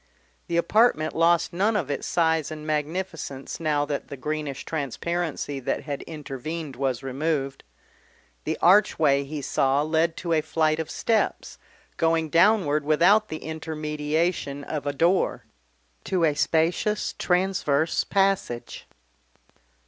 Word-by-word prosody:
The 170 - -1
apartment 210 -3 +3
lost 170 +1 +3
none 205 +5 +1
of 160 -9 -1
its 145 - -3
size 160 -3 +1
and 155 -1 -7
magnificence 155 -2 -3
now 150 -3 +1
that 145 -1 -4
the 140 - -8
greenish 150 0 -4
transparency 155 0 -3
that 125 - -2
had 145 -2 -4
intervened 150 0 -6
was 130 -2 -2
removed. 135 0 -2 0.8
The - - -2
archway 160 -7 +4
he 145 0 -6
saw 135 +2 +2
led 160 +1 +1
to 170 -1 -2
a 155 - +3
flight 155 0 +1
of 160 - -3
steps, 225 -1 -1 0.4
going 165 -1 +1
downward 170 -5 +4
without 180 +8 +4
the 155 - -6
intermediation 155 -1 -2
of 145 -1 -4
a 145 - 0
door, 170 +6 +1 0.6
to 185 -3 0
a 155 -2 +4
spacious 165 +8 0
transverse 180 -5 +1
passage. 195 - -1
155 Hz, 125 wpm, -25 LUFS, 145-170 Hz, 0.8 s, archway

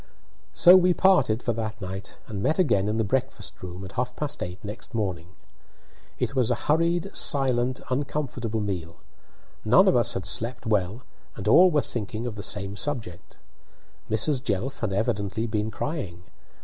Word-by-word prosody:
So 180 +1 +7
we 180 -1 +4
parted 140 - +3
for 120 - 0
that 110 -1 -4
night, 95 -1 -6
and 100 -3 -5
met 155 - +1
again 100 - +2
in 105 +1 -1
the 110 - +2
breakfast 125 -2 -2
room 90 +1 -7
at 95 - -9
half 125 +3 -3
past 150 -1 -4
eight 90 0 -4
next 105 +3 -8
morning. 95 -6 -2 0.9
It - - -2
was 125 -4 +2
a - - +2
hurried, 170 +5 +1
silent, 130 -2 +1
uncomfortable 125 -5 -2
meal; 90 -5 -4 0.7
none - - +5
of - - +4
us - - +2
had - - -3
slept 120 +3 0
well, 105 +2 0 0.3
and 105 -1 -6
all 180 +11 +7
were 150 -4 +2
thinking 110 -1 -5
of 120 - -3
the 105 - -7
same 100 -1 -1
subject. 110 - -4 0.7
Mrs. 125 +5 +3
Jelf 125 +3 -2
had 110 -4 -2
evidently 100 +2 -1
been 110 -1 -2
crying. 100 - -5
110 Hz, 165 wpm, -25 LUFS, 100-135 Hz, 0.9 s, So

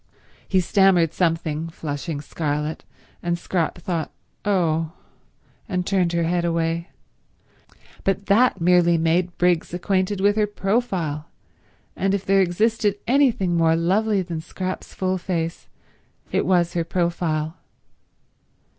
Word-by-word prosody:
He 190 -1 +3
stammered 180 -3 +3
something, 165 -2 -1
flushing 145 -1 -5
scarlet, 150 +1 -3 0.4
and 175 0 -1
Scrap 170 -1 -1
thought, 170 -2 -3 0.3
"Oh," 165 -5 +1 0.8
and 180 -2 -1
turned 180 -3 +1
her 170 0 +1
head 170 +1 0
away; 170 0 -1 1.1
but 195 +1 0
that 230 +6 +3
merely 175 0 +4
made 170 +2 +1
Briggs 175 -1 +1
acquainted 190 +2 0
with 205 +2 +3
her 210 -1 +3
profile, 190 -8 -1 0.7
and 195 +1 +1
if 200 - -4
there 195 0 +4
existed 205 +3 +1
anything 235 -8 +2
more 165 -1 +3
lovely 195 +4 +1
than 170 -3 -5
Scrap's 185 +3 -5
full 185 0 -1
face 170 -2 -3 0.6
it - - 0
was 175 -2 +2
her 170 - 0
profile. 170 -2 -1
175 Hz, 120 wpm, -23 LUFS, 165-195 Hz, 1.1 s, merely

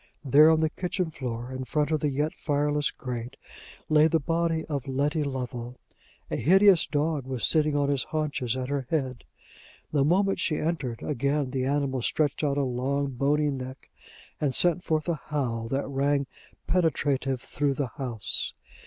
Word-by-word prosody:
There, 145 +4 +7
on 160 0 +4
the 160 - +2
kitchen 180 -2 -2
floor, 125 -4 -5
in 130 0 -4
front 150 +3 0
of 155 - +2
the 150 - 0
yet 145 +3 -1
fireless 145 -1 0
grate, 125 -1 -6 0.5
lay 155 0 +5
the 165 0 +2
body 165 +1 0
of 140 -3 -4
Letty 145 +3 0
Lovel. 125 -3 -5 0.5
A - - 0
hideous 190 +1 +5
dog 150 -2 -1
was 130 -3 -1
sitting 155 -2 +2
on 145 -1 +1
his 140 -3 0
haunches 145 -6 -2
at 130 0 -3
her 140 -3 -2
head. 130 -6 -2 0.7
The 145 -3 +3
moment 195 +6 +2
she 155 - +1
entered, 145 -8 -2
again 140 0 0
the 130 -1 -1
animal 135 -2 0
stretched 150 +4 0
out 140 -1 +1
a 140 - +2
long, 135 +2 -1
bony 145 +3 +1
neck, 130 0 -7 0.5
and 140 -4 0
sent 175 0 +3
forth 155 0 0
a 165 -3 -1
howl 120 -6 -2
that 135 +4 -1
rang 140 +1 +1 0.4
penetrative 140 -6 +1
through 140 +2 -1
the 135 -4 -2
house. 120 -6 -2
145 Hz, 170 wpm, -27 LUFS, 130-155 Hz, 0.7 s, There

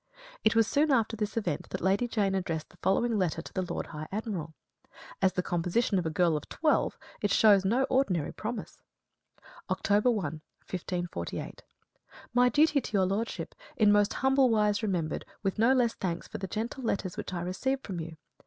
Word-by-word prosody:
It 220 - +3
was 225 -1 +5
soon 290 +7 +2
after 225 -3 +2
this 215 0 -3
event 225 - -2
that 185 - -3
Lady 195 +6 +2
Jane 205 -4 0
addressed 170 -5 -2
the - - -20
following 215 +4 +1
letter 180 -4 0
to - - -11
the 185 - -1
Lord 180 - -3
High 155 -1 -7
Admiral. 190 -7 -4 0.7
As 190 -2 +3
the 180 - -1
composition 180 +5 +1
of 170 - -2
a - - 0
girl 165 0 +2
of 150 - -5
twelve 310 -1 +1 0.2
it 205 - +1
shows 205 -3 +5
no 240 +7 +3
ordinary 255 - +1
promise: 225 +2 -6 0.9
October 210 +4 +2
1, 215 -6 +1 0.4
1548. 175 - -4 0.7
My 245 0 +5
duty 295 +1 +4
to - - -8
your 195 -2 +3
lordship, 205 +5 -2 0.2
in 210 -2 +5
most 205 0 +3
humble 265 -1 +3
wise 210 -2 +2
remembered, 180 -7 -1 0.2
with 195 +1 -1
no 230 +3 +5
less 245 -3 +3
thanks 175 -3 -3
for - - -7
the 190 - -4
gentle 230 +7 -4
letters 195 -5 -1
which - - -5
I 175 -2 -3
received 265 +10 -2
from 185 -4 -4
you. 160 0 -7
205 Hz, 185 wpm, -29 LUFS, 180-230 Hz, 0.9 s, was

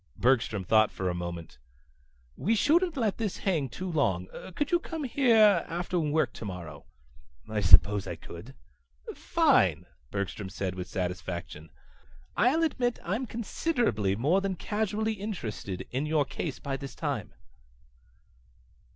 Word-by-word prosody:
Bergstrom 115 -5 +2
thought 110 +3 +4
for 95 -1 -2
a - - -3
moment. 85 -5 -6 0.8
"We 225 - +1
shouldn't 325 - +3
let 220 -6 0
this 215 -4 -2
hang 160 -9 0
too 185 +11 -6
long. 95 - +1 0.3
Could 295 +2 -1
you 345 - +4
come 325 -2 -5
here 230 -6 +5
after 175 +1 -2
work 155 0 +1
tomorrow?" 90 -8 -8 0.6
"I 110 -1 -1
suppose 100 +1 +6
I - - -4
could." - - -11 0.6
"Fine," - - +3 0.2
Bergstrom 100 0 -4
said 95 -1 -3
with 90 -1 -6
satisfaction. 90 -3 -4 0.7
"I'll 255 - +3
admit 245 -6 0
I'm 220 +9 -2
considerably 225 - 0
more 150 - +2
than 195 -1 -1
casually 215 +3 -1
interested 115 - -5
in 135 +4 -1
your 150 -2 +2
case - - -4
by 135 -1 -4
this 135 0 -8
time." 140 - -3
150 Hz, 135 wpm, -29 LUFS, -, 0.8 s, suppose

